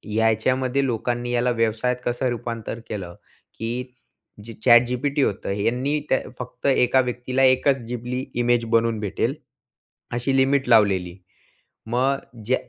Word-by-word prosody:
याच्यामध्ये 125 +5 +1
लोकांनी 120 0 -2
याला 125 +1 +1
व्यवसायात 115 +1 0
कसं 120 +2 0
रूपांतर 115 -1 -5
केलं 90 -5 -6 0.4
की 115 +1 -4 0.7
जे 115 - -8
ChatGPT 125 +4 +4
होतं, 100 - -3
यांनी 130 +7 0
त्या 130 - +3 0.2
फक्त 125 -1 -9
एका 130 -1 +4
व्यक्तीला 125 +1 -1
एकच 130 +1 +4
जिबली 125 +2 -4 0.2
इमेज 120 -1 +2
बनवून 115 -1 +2
भेटेल 105 -4 -1 0.8
अशी 120 +3 0
लिमिट 135 -1 +2
लावलेली. 95 -6 +3 0.7
मग 130 +4 +1 0.3
ज 130 - +4
120 Hz, 125 wpm, -23 LUFS, 115-130 Hz, 0.8 s, ChatGPT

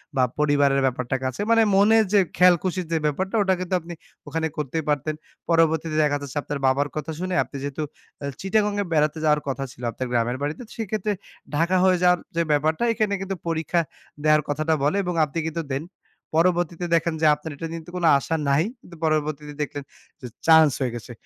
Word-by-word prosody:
বা 130 - +3 0.2
পরিবারের 145 -2 +3
ব্যাপারটা 125 0 -1
কাছে। 130 -1 -3
মানে 225 0 +6
মনের 220 +3 +5
যে 205 - +6 0.2
খেয়াল-খুশির 180 0 +3
যে 165 - +2
ব্যাপারটা, 190 +8 -1
ওটা 190 -1 +2
কিন্তু 185 0 -4
আপনি 170 +1 -9 0.3
ওখানে 160 +2 -1
করতেই 150 +2 -2
পারতেন। 150 +1 0 0.3
পরবর্তীতে 160 -1 +2
দেখা 145 -1 +1
যাচ্ছে 140 +1 -6
আপনার 145 -1 -4
বাবার 140 +2 +2
কথা 155 +1 -4
শুনে, 185 0 -3
আপনি - - -14
যেহেতু 145 +2 -3 0.4
এ - - -2 0.2
চিটাগং 205 +2 +1
এ - - 0
বেড়াতে 150 0 +2
যাওয়ার 150 -1 +3
কথা 135 0 -2
ছিল, 120 - -15
আপনার 130 +2 -4
গ্রামের 120 +1 0
বাড়িতে। 150 - -3
তো - - -19
সেক্ষেত্রে 215 -1 -2 0.4
ঢাকা 170 +4 +2
হয়ে 185 -1 +4
যাওয়ার 180 0 +5 0.2
যে 170 - +2
ব্যাপারটা, 155 +7 +1
এখানে 215 -2 0
কিন্তু 195 0 -3
পরীক্ষা 165 +1 0 0.4
দেওয়ার 155 0 +5
কথাটা 155 +2 0
বলে 150 +7 +2
এবং 180 -1 -2
আপনি 150 +3 -4
কিন্তু 165 +1 -3
দেন। 135 +3 -2 0.5
পরবর্তীতে 175 0 +1
দেখেন 165 0 +1
যে, - - +3
আপনার 155 +1 -8
এটা 165 - -6
নিয়ে 165 0 -5
কিন্তু 175 +3 -14
কোনো 170 -2 +2
আশা 160 +4 -2
নাই, 140 +3 +3 0.2
কিন্তু 170 - -14
পরবর্তীতে 150 -1 -1
দেখলেন 145 -1 -4 0.4
যে 125 - -6 0.2
চান্স 160 -3 +7
হয়ে 125 -2 -1
গেছে। 120 +1 -8
160 Hz, 195 wpm, -24 LUFS, 145-180 Hz, 0.5 s, চান্স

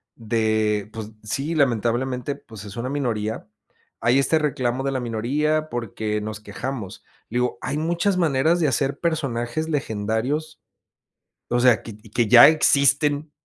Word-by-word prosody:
de, 110 -2 0
pues 110 -1 -7
sí, 140 +9 -3
lamentablemente, 125 +1 0
pues 110 -8 -12
es 105 +1 -10
una 120 +2 -3
minoría, 115 -7 -2 0.5
hay 125 +3 +3
este 155 +3 +2
reclamo 130 -4 -1
de 135 - -1
la 130 - -1
minoría 145 +7 0
porque 110 -3 -3
nos 105 0 -5
quejamos, 105 0 -6 0.3
digo, 125 +2 -1
hay - - -3
muchas 170 +5 0
maneras 160 +1 +2
de 155 - +3
hacer 135 +2 -1
personajes 155 -3 -2
legendarios, 135 +4 -2 0.9
o 120 0 +2
sea, 125 -3 +4
que 110 -2 -10
que 110 +1 -2
ya 120 +4 +10
existen 145 0 +3
125 Hz, 140 wpm, -23 LUFS, 110-145 Hz, 0.9 s, ya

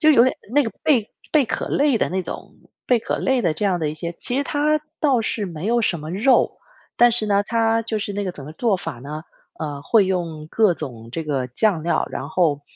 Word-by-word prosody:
就 310 - +6
有 240 -5 +7
点 260 - +2 0.2
那 290 - +6
个 225 - -3
贝 240 -8 +2 0.2
贝 300 -3 +4
壳 - - -3
类 280 -5 +2
的 - - +1
那 190 +1 -1
种 165 - -8 0.3
贝 245 - +4
壳 - - -2
类 265 -2 +1
的 165 - +2
这 205 - -1
样 185 -3 +1
的 155 -2 -1
一 - - -6
些 170 +1 -6
其 245 - -2
实 280 - +2
它 300 +1 +1 0.2
倒 275 -6 +3
是 220 -1 -2
没 165 +1 -6
有 235 +1 +2
什 170 -6 0
么 155 +1 -6
肉， 230 +9 +3 0.4
但 240 0 +6
是 220 -2 0
呢， 200 -1 +3
它 225 0 +2
就 225 -1 -2
是 205 -1 -4
那 205 0 -2
个 185 - -3
怎 145 - -10
么 - - -7
做 225 +2 +1
法 - - -5
呢， 150 +4 -6 0.4
呃， 145 -3 -4
会 205 +3 +4
用 165 -5 -2
各 215 -5 +4
种 115 -7 -8
这 165 - -2
个 135 -4 -1
酱 170 - +1
料， 170 - +1
然 140 +3 -5
后 150 -6 +1
200 Hz, 260 characters per minute, -22 LUFS, 160-235 Hz, 0.4 s, 有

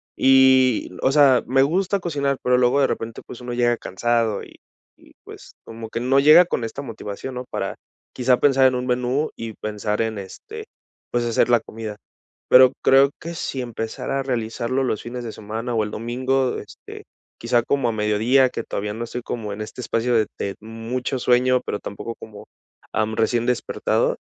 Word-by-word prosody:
y, 130 -2 +4
o 130 - +3
sea, 140 -3 +5
me 135 +2 +4
gusta 190 +7 +1
cocinar, 140 -6 -1
pero 125 0 +3
luego 125 +3 +3
de 140 - +4
repente, 115 0 -5
pues, 125 - -10
uno 120 0 -5
llega 120 0 +2
cansado 115 +1 -1
y - - -14 0.4
y, - - -22
pues, - - -13
como 115 0 -8
que 115 - -4
no 130 +3 +3
llega 155 +5 +8
con 145 - -2
esta 115 +5 -5
motivación, 115 0 -7
¿no? 125 0 -6
Para - - -4 0.4
quizá 125 0 +2
pensar 135 -2 +5
en 130 - +1
un 125 0 -2
menú 125 +4 0
y 115 -1 -6
pensar 105 +1 -2
en, 110 -2 -3
este, 95 -1 -9 0.4
pues, 120 0 -1
hacer 115 +1 +2
la 120 -1 +5
comida. 110 -1 -8 0.5
Pero 130 0 +7
creo 135 +1 +6
que 170 +1 -6
si 135 -4 -4
empezara 120 +3 -4
a - - -1
realizarlo 120 +1 -2
los 115 -5 -1
fines 120 +1 -6
de 115 - -5
semana 110 +3 -5
o 110 - +2
el 105 - -4
domingo, 130 +3 -1
este, - - -12 0.3
quizá 120 0 +1
como 135 -1 0
a - - 0
mediodía, 110 +5 +2
que - - -5
todavía 105 +1 -4
no 115 +2 -4
estoy 120 +1 -6
como 110 -4 -5
en 105 - -7
este 110 +3 -7
espacio 120 0 -1
de 110 -2 +2
de 100 - -3
mucho 115 +4 -4
sueño, 125 +1 +3
pero 105 - -3
tampoco 110 +3 -6
como, 105 -2 -12 0.5
am, 110 0 0
recién 115 +1 +1
despertado, 125 -2 0
120 Hz, 190 wpm, -22 LUFS, 115-130 Hz, 0.5 s, llega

